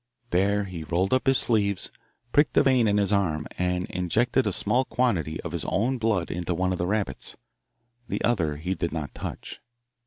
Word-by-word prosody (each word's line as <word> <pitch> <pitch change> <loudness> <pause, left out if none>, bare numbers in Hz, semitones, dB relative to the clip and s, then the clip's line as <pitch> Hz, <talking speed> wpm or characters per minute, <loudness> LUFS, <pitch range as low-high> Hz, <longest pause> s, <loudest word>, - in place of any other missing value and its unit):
There 100 +3 +2
he 90 -4 -6
rolled 90 +7 0
up 130 +1 +1
his 135 -1 +5
sleeves, 100 -5 +1 0.4
pricked 145 +1 +3
a - - +7
vein 130 -4 +4
in 105 0 +2
his 100 0 +2
arm, 80 -7 +1
and 90 0 0
injected 105 +9 +1
a - - +1
small 130 +2 +2
quantity 100 - 0
of - - -6
his - - -2
own 125 +6 0
blood 110 -6 0
into 90 +1 -2
one 95 +2 0
of 90 - -2
the 90 - 0
rabbits. 100 -9 -3 0.7
The - - -3
other 85 -11 +1
he 90 +5 -2
did 85 -3 -2
not 80 -3 -4
touch. - - -7
95 Hz, 190 wpm, -26 LUFS, 85-115 Hz, 0.7 s, a